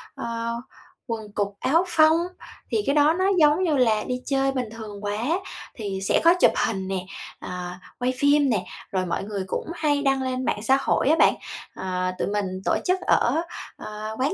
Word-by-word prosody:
ơ, 230 0 -3 0.5
quần 220 -3 -5
cụt, 205 -1 0
áo 330 +6 +3
phông, 315 -1 +5 0.5
thì - - +2
cái 280 - +2
đó 300 +1 +5
nó 370 +3 0
giống 300 +4 +5
như 310 -6 +2
là 220 -4 +3
đi 250 0 -3
chơi 270 -1 +1
bình 255 -4 -3
thường 210 -3 -8
quá. 205 0 -2 0.6
Thì 200 -4 -4
sẽ 195 - +2
có 335 +1 +7
chụp - - +7 0.2
hình 190 -4 -3
nè, 185 -1 -3 0.3
à, 180 0 -6 0.2
quay 250 +1 0
phim 285 0 +4
nè, 210 -6 0 0.3
rồi 185 -1 0
mọi 170 - -2
người 200 -1 -4
cũng - - -3
hay 295 -3 +1
đăng 270 -1 +2
lên 255 0 -2
mạng 205 - -1
xã 265 +4 +4
hội 275 - +2
á 320 - +6
bạn. - - +6 0.4
Ờ, 185 -1 -2
tụi - - 0
mình 205 0 0 0.2
tổ - - +3
chức 370 +1 +2
ở, 325 - +2 0.4
ờ, 215 +1 -6
quán 270 +4 +1
235 Hz, 195 wpm, -24 LUFS, 205-285 Hz, 0.6 s, có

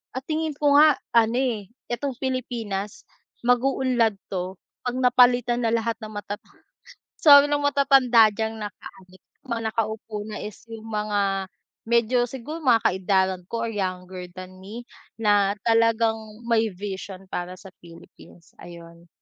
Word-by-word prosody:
at 260 - -4
tingin 315 0 -1
ko 290 0 +3
nga, 295 -2 +6 0.2
ano 230 +1 +4
eh, 225 -6 -2 0.2
itong 260 +2 -3
Pilipinas 230 -6 -4 0.4
mag-uunlad 245 -3 +2 0.2
'to 185 0 -3 0.3
'pag 245 0 -2
napalitan 245 -1 +3
na - - +1
lahat 230 0 -1
ng 215 -2 -8
matata 205 0 -6 0.8
sabi 285 -2 +8
ng 290 - +2
matatanda 270 -6 +4
diyang 220 +1 -3
naka-ano 195 -3 -10 0.3
mga 235 -2 -2
nakaupo 220 -1 -3
na 210 0 -7
is 210 -1 -7 0.2
yung 225 0 -9
mga 205 -3 -1 0.4
medyo 235 +1 +2
siguro 265 +6 -7
mga 240 -4 +5
kaedaran 190 0 0
ko 230 0 -3
or - - -3
younger 185 -2 -4
than 185 0 -10
me 215 +6 -9 0.4
na 205 -2 +3
talagang 230 -1 +3 0.3
may 225 -2 +2
vision 190 0 -7
para 180 0 -5
sa 195 - -12 0.2
Philippines, 170 0 -16
ayun. 170 0 -13
225 Hz, 135 wpm, -24 LUFS, 195-245 Hz, 0.8 s, sabi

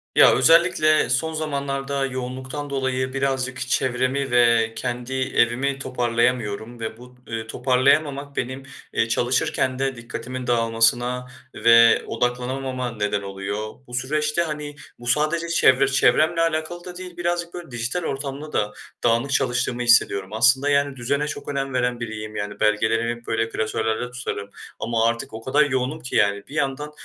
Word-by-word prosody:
Ya, - - +7
özellikle 165 -3 +4
son 145 +7 0
zamanlarda 140 -2 -2
yoğunluktan 130 +3 -5
dolayı 130 -1 -1
birazcık 130 -2 -1
çevremi 130 +1 0
ve 115 -2 +4
kendi 125 +1 -4
evimi 130 +1 +1
toparlayamıyorum 120 -3 -1
ve 110 -1 -5
bu, 125 +1 -14
eee, 115 -1 -4
toparlayamamak 140 +3 +1
benim, 130 +2 -3 0.3
eee, 115 - +1
çalışırken 130 +2 0
de 135 -1 0
dikkatimin 125 +2 -6
dağılmasına 120 +2 +1 0.3
ve 115 0 +6
odaklanamama 125 +1 -2
neden 105 -2 -1
oluyor. 100 +2 -5
Bu 120 - -13
süreçte, 150 +5 0
hani, 150 -3 -4 0.2
bu 120 - -10
sadece 155 +6 +1
çevre 135 -5 +4
çevremle 155 +5 +3
alakalı 165 +1 -1
da 180 -1 -8
değil, 180 -1 -9
birazcık 175 0 -2
böyle, 175 -5 -8
dijital 120 +9 -3
ortamda 140 +1 -5
da 105 0 0 0.3
dağınık 120 +4 +2
çalıştığımı 125 -2 0
hissediyorum. 100 -5 +3
Aslında, 125 +5 +4
yani, 140 -1 +2
düzene 140 +4 -1
çok - - -6
önem 135 -1 -2
veren 125 -1 0
biriyim. 110 -2 -6
Yani, 105 0 -4
belgelerimi 110 +2 +2
hep 120 0 -9
böyle 115 0 0
klasörlerde 110 +2 -2
tutarım 110 -5 -5 0.3
ama 115 0 0
artık 115 -1 -1
o 110 - -6
kadar 140 +5 +3
yoğunum 130 +2 -1
ki 130 - -6
yani, 100 -1 +2
bir 145 - -10
yandan 150 0 -2
130 Hz, 145 wpm, -23 LUFS, 115-140 Hz, 0.3 s, Ya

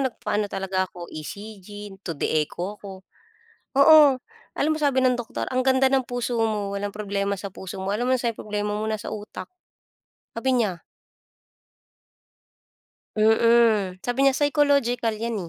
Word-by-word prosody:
nagpaano 215 -5 -1
talaga 190 -1 -2
ako, 175 -1 -10
ECG, 205 +4 -9
2D 165 -7 -4 0.2
echo 180 +7 -5
ako, 190 -2 -10 0.7
oo. 285 -2 +7 0.4
Alam 310 +2 +2
mo 310 - -5
sabi 280 -3 +2
ng 255 - +4
doktor, 240 -2 -4
ang 255 - +2
ganda 260 0 +3
ng 265 - +4
puso 245 0 -3
mo. 210 -3 -1
Walang 205 +1 -3
problema 200 -1 -2
sa 195 0 -7
puso 190 - -8
mo. 190 +1 -2
Alam 245 +4 -1
mo - - +3
nasa'n 235 -1 -1
problema 210 -1 -3
mo? 215 +1 -2
Sa - - -6
utak, 210 0 -7 0.9
sabi 255 +3 -1
niya. 200 -9 -1 2.3
Mm. 220 -3 +4
Sabi 245 +2 -2
niya, 275 -1 +4
psychological 280 -5 +2
'yan, 230 0 -3
215 Hz, 145 wpm, -24 LUFS, 200-250 Hz, 2.3 s, oo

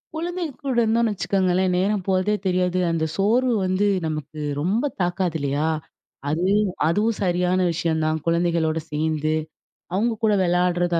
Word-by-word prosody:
குழந்தைங்க 340 -2 -3
கூட 265 - 0
இருந்தோம்னு 225 0 +2
வச்சுக்கோங்களேன், 185 -1 +1
நேரம் 195 +1 +1
போறதே 190 +2 +2
தெரியாது, 180 0 +1
அந்த 160 -1 0
சோர்வு 235 +5 +2
வந்து 185 +3 +1 0.2
நமக்கு 155 0 -5 0.2
ரொம்ப 205 - +1 0.2
தாக்காது 175 -1 0
இல்லையா? 145 +2 0 0.6
அது 165 +4 0 0.4
அதுவும் 210 +6 +1
சரியான 180 0 +1
விஷயம் 160 -1 -1
தான் 155 0 0
குழந்தைகளோடு 165 -1 +1
சேந்து, 155 0 0 0.6
அவுங்க 225 +4 +1
கூட 215 -1 +4
விளையாடுறதா 175 -1 +1
180 Hz, 130 wpm, -23 LUFS, 165-205 Hz, 0.6 s, கூட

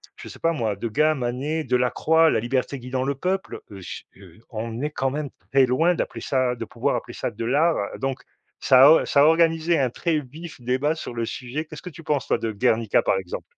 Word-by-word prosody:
je - - -11
sais - - -12
pas 165 0 +1
moi, 110 -8 -1
Degas, 120 +9 +1
Manet, 135 +5 -2
Delacroix, 150 +6 +3
La 115 - +2
liberté 130 +3 -2
guidant 130 +1 -3
le 140 +1 -1
peuple, 190 +6 -3
heu, 100 -2 -9
j 85 - -8
heu, 95 -1 -16
on 115 +2 -5
est 150 - -2
quand 135 -2 -1
même 145 0 -4 0.2
très 135 -1 +5
loin 160 +8 +2
d'appeler - - -4
ça 130 -2 0
de - - -6
pouvoir - - -1
appeler - - -5
ça - - -3
de 115 - -5
l'art, 155 +7 +3 0.2
donc 135 -1 -2 0.4
ça 130 0 +6
a 160 - +6
ça 140 - +3
a - - +7
organisé 165 0 +3
un 130 - +2
très 160 +5 -1
vif 150 +2 -10
débat 130 +6 0
sur 155 - -7
le 115 -1 -2
sujet. 125 +7 -5
Qu'est-ce 155 -1 -10
que - - -8
tu 165 +2 -12
penses 145 -4 -1
toi - - +2
de 115 - -3
Guernica, 110 0 +2
par - - +1
exemple? 95 -2 -5
135 Hz, 225 wpm, -23 LUFS, 120-155 Hz, 0.4 s, a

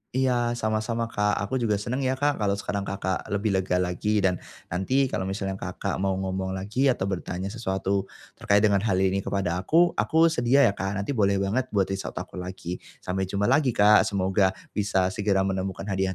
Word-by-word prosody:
Iya 120 -2 +1
sama-sama 110 +1 -1
Kak, 105 -1 +1
aku 100 +6 -2
juga 110 -3 +1
senang 120 +6 -3
ya 130 -1 0
Kak, 145 +1 0
kalau 100 -2 +1
sekarang 100 0 -3
Kakak, 95 -1 -3
lebih 100 +1 -1
lega 95 -1 0
lagi 90 +4 0
dan, 90 -2 +2 0.3
nanti 95 +10 +1
kalau 95 - -2
misalnya 95 0 -3
Kakak, - - -4
mau 95 0 0
ngomong 95 0 -3
lagi 105 +8 0
atau 125 -7 +1
bertanya 95 +1 -4
sesuatu 95 -3 -2 0.3
terkait 100 +1 +3
dengan 100 -2 +4
hal 100 -2 0
ini 95 +1 +2
kepada 95 -3 -1
aku, 170 - +3
aku 165 +1 +4
sedia 130 0 +3
ya 100 - +5
Kak, 95 0 -3
nanti 100 +6 -2
boleh 100 -6 +2
banget 100 +7 0
buat 95 -1 +2
reach 95 0 -3
out - - -7
aku - - -6
lagi, 90 -1 -6 0.2
sampai 95 +1 -2
jumpa 100 +2 0
lagi 135 -5 +3
Kak, 105 0 +6
semoga 95 -1 +1 0.2
bisa 95 -3 +1
segera 100 -1 +1
menemukan 95 0 -2
hadiah 95 -1 -1
100 Hz, 195 wpm, -26 LUFS, 95-110 Hz, 0.3 s, Kak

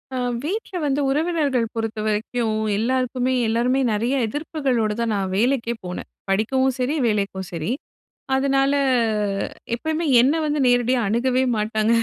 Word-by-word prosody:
அ - - -1 0.3
வீட்ல 385 +3 -3
வந்து 285 0 +1
உறவினர்ங்கள் 295 -4 +1
பொறுத்த 225 -1 -3
வரைக்கும் 220 +1 -1 0.2
எல்லாருக்குமே 255 +2 0
எல்லாருமே 245 +4 +1
நெறைய 230 +5 0
எதிர்ப்புகளோடு 265 -5 -1
தான் 230 -1 0
நான் 195 -1 -1
வேலைக்கே 235 +1 +1
போனேன். 180 - -6 0.2
படிக்கவும் 260 +7 +2
சரி, 255 +5 0
வேலைக்கும் 200 -3 -1
சரி. 165 +1 -3 0.7
அதனால 270 +1 +2 1.0
எப்பயுமே 315 +6 -2 0.2
என்ன 265 +5 +4
வந்து 300 0 0
நேரடியா 245 +1 +3
அணுகவே 250 +4 +1
மாட்டாங்க. 215 +1 +1
245 Hz, 125 wpm, -22 LUFS, 220-270 Hz, 1.0 s, என்ன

